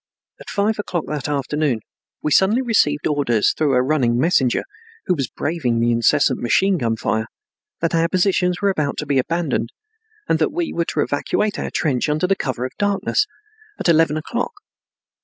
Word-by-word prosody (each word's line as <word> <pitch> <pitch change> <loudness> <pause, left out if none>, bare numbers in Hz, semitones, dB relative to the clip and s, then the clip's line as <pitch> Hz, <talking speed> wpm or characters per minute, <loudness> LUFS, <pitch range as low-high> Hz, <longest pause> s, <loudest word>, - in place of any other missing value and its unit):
At - - -11
five 210 +2 0
o'clock 175 -5 -2
that 150 -1 -3
afternoon 145 -3 -1 0.4
we 150 - 0
suddenly 210 - +4
received 150 - +2
orders 135 -8 +2
through 145 -4 +1
a 125 - +3
running 130 -4 +1
messenger, 130 -3 +2 0.4
who - - +2
was 135 -7 -2
braving 145 -8 -1
the 120 +1 +2
incessant 130 +3 +2
machine 185 +10 +2
gun 115 -3 0
fire, 110 0 -1 0.5
that 165 0 0
our 165 0 +3
positions 180 0 +1
were 200 - +4
about 150 -6 -2
to 150 - -3
be 140 -2 +1
abandoned 145 -6 -1 0.6
and - - +2
that - - +1
we 345 -2 -2
were 170 - 0
to 150 - -1
evacuate 205 +9 -1
our - - -3
trench 140 -2 0
under 150 +4 +1
the 195 +2 +2
cover 125 - -3
of 130 - -5
darkness, 205 - +1 0.5
at - - -2
eleven 160 -2 +4
o'clock. 240 - -3
150 Hz, 175 wpm, -20 LUFS, 130-180 Hz, 0.6 s, suddenly